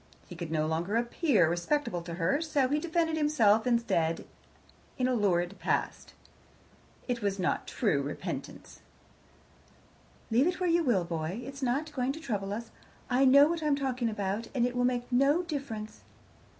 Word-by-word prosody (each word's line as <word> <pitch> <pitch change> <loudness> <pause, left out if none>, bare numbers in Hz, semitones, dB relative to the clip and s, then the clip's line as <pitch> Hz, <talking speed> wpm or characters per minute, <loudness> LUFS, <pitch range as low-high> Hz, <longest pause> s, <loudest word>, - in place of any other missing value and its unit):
He - - -9
could 170 -3 -6
no 155 -1 0
longer 165 +6 -1
appear 235 - +2
respectable 175 - -1
to 170 0 -7
her, 180 - +1
so 295 -5 +1
he 295 +2 +1
defended 325 0 0
himself 235 -8 +3
instead 200 -9 +1 0.7
in 255 -2 +1
a 255 - +1
lurid 190 -4 0
past. - - -2 0.9
It 245 -2 -2
was 200 -1 -1
not 185 - -1
true - - 0
repentance. - - -6 1.5
"Leave 250 +7 +4
it 360 +1 -1
where 365 - 0
you 340 0 +3
will, 235 - +2
boy. 170 +5 -4
It's 275 +1 -8
not 275 +5 -1
going 260 0 -1
to 315 - -8
trouble 205 -9 -3
us: 225 +2 -5 0.4
I 260 +2 +4
know 280 +2 +7
what 335 0 -2
I'm 300 -2 +2
talking 255 -4 -1
about, 205 +1 -3
and 240 -2 +3
it 245 0 -2
will 245 0 +2
make 245 -1 0
no 275 +7 +3
difference." 270 -10 -6
245 Hz, 165 wpm, -29 LUFS, 195-285 Hz, 1.5 s, know